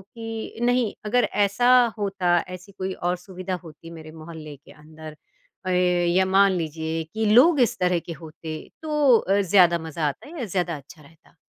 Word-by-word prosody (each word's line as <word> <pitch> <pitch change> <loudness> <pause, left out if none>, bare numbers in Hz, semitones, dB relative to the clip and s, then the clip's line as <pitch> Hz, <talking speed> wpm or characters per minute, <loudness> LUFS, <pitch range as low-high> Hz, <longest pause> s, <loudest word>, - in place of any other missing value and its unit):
कि 225 0 -7
नहीं, 245 -3 +1
अगर 245 +3 +2
ऐसा 205 +5 +1 0.3
होता, 190 -4 +1
ऐसी 180 +2 -10
कोई 190 -1 -5
और 175 +1 -2
सुविधा 185 +1 -6
होती 165 +1 -13
मेरे 160 -1 -11
मोहल्ले 155 -2 -10
के 140 - -19
अंदर 155 0 -12 0.5
अए 180 0 +2 0.3
या 185 +2 +3
मान 195 +1 +4
लीजिए 160 -1 -3
कि 220 0 -1
लोग 290 +5 +6
इस 235 - +1
तरह 180 -1 +1
के 170 - -8
होते, 160 0 -8 0.2
तो 300 -6 +3
अ, 195 0 +1
ज़्यादा 175 -2 +4
मज़ा 160 -1 -3
आता 145 - -6
है 335 - -9
या 245 - -2
ज़्यादा 175 -4 -2
अच्छा 150 +3 -15
रहता? 160 +2 -22
180 Hz, 175 wpm, -24 LUFS, 160-205 Hz, 0.5 s, लोग